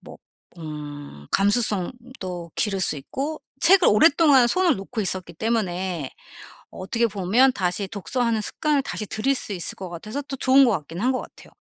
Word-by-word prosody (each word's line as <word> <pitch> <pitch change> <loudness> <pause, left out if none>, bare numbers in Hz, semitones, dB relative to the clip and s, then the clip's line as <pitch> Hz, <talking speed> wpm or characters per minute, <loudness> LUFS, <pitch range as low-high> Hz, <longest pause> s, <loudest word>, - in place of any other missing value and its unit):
뭐 - - -12 0.4
음 145 - -8
감수성도 205 -3 -1
기를 195 -3 -1
수 175 - 0
있고 280 - -5 0.2
책을 365 +2 +6
오랫동안 280 +1 +5
손을 350 +3 +2
놓고 215 +4 -4
있었기 185 -3 -4
때문에 185 - -2 0.6
어떻게 230 +5 -1
보면 210 +7 +3
다시 190 -1 -1
독서하는 225 +3 -1
습관을 295 +7 0
다시 260 -5 -4
들일 220 +7 0
수 215 - -4
있을 175 -4 -4
것 185 -2 -7
같아서 215 - -6
또 275 - -7
좋은 265 +2 +5
것 240 - +3
같긴 165 -2 -4
한 255 +2 +2
것 255 - -2
같아요. - - -14
210 Hz, 325 characters per minute, -23 LUFS, 180-260 Hz, 0.6 s, 책을